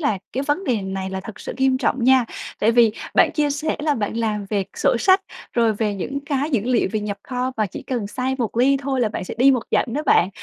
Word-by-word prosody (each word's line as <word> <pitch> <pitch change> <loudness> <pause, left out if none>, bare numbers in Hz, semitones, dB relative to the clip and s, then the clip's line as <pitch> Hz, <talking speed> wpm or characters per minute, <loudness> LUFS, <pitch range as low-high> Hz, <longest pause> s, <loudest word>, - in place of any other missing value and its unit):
là 250 - 0
cái 265 - -1
vấn 295 +7 -1
đề 235 - 0
này 190 0 -4
là 190 0 -4
thật 220 - -9
sự - - -5
nghiêm 265 -1 +2
trọng 255 -1 0
nha. 260 -1 +5 0.3
Tại 220 +2 +3
vì 230 -2 +5 0.2
bạn - - +5
chia 295 -1 +1
sẻ 305 +2 -1
là 295 -1 +1
bạn 220 -2 -3
làm 215 -3 -1
về 200 -2 0
sổ - - +2
sách, 380 +7 +4 0.3
rồi 230 -2 +3
về 210 -1 -1
những 270 +9 -3
cái 285 +1 -1
dữ 250 -7 +2
liệu 250 -1 +2
về 215 - 0
nhập 205 -1 -4
kho 255 0 -3
và 215 -1 +1
chỉ - - -8
cần 240 -6 -3
sai 255 +4 -2
một 230 -3 -2
ly 265 +3 +4
thôi 270 -1 -2
là 230 - +2
bạn 210 - -5
sẽ - - -6
đi 265 +3 +6
một 255 -4 +1
dặm - - +3
đó 300 - -1
bạn. 180 - +4
245 Hz, 265 wpm, -22 LUFS, 215-270 Hz, 0.3 s, đi